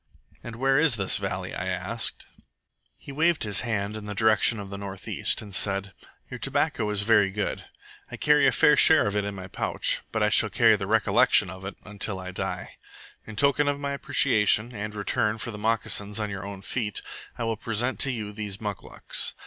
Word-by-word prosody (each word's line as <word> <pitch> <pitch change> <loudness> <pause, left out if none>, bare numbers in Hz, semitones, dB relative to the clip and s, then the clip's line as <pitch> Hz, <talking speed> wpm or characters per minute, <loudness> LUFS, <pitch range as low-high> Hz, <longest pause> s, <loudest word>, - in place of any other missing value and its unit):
"And 120 -1 -8
where 135 +3 +2
is 160 -6 +3
this 100 -3 +1
valley?" - - -4
I - - -4
asked - - -3 0.7
He - - -11
waved 160 +3 +1
his 105 -2 0
hand 105 -3 -2
in 110 -1 -7
the 105 0 -6
direction 110 +1 +3
of 100 -1 -8
the 100 - -5
north 100 -1 -8
east, - - -2
and 100 -2 -12
said: 100 0 0 0.3
"Your 125 - -8
tobacco 135 -5 0
is 105 -1 0
very 105 -2 +4
good. 105 +2 -4 0.4
I - - -8
carry - - +4
a - - +4
fair - - +4
share - - +6
of 105 0 -2
it 105 -1 0
in 100 -1 -5
my 95 -1 -8
pouch, - - 0
but 110 -1 0
I 105 - +3
shall 110 0 +4
carry 115 -1 +4
the 100 -2 -5
recollection 110 -3 +3
of 95 +1 -10
it 95 - -6
until 105 -2 -2
I 95 0 -7
die. 90 -1 -5 0.5
In 110 - -9
token 140 +4 +3
of 145 0 0
my 140 0 -3
appreciation, 125 -6 +2
and 105 -1 -5
in - - -9
return 105 +1 -1
for 120 - -5
the 105 - -8
moccasins 105 -1 0
on 105 -1 -3
your 100 0 -6
own 100 -1 -9
feet, 105 -2 -2 0.3
I - - -3
will 115 -1 -1
present 115 +3 -2
to 135 - +3
you 105 -4 -5
these 105 -1 -4
muclucs. 105 -3 -1
105 Hz, 210 wpm, -26 LUFS, 100-120 Hz, 0.7 s, share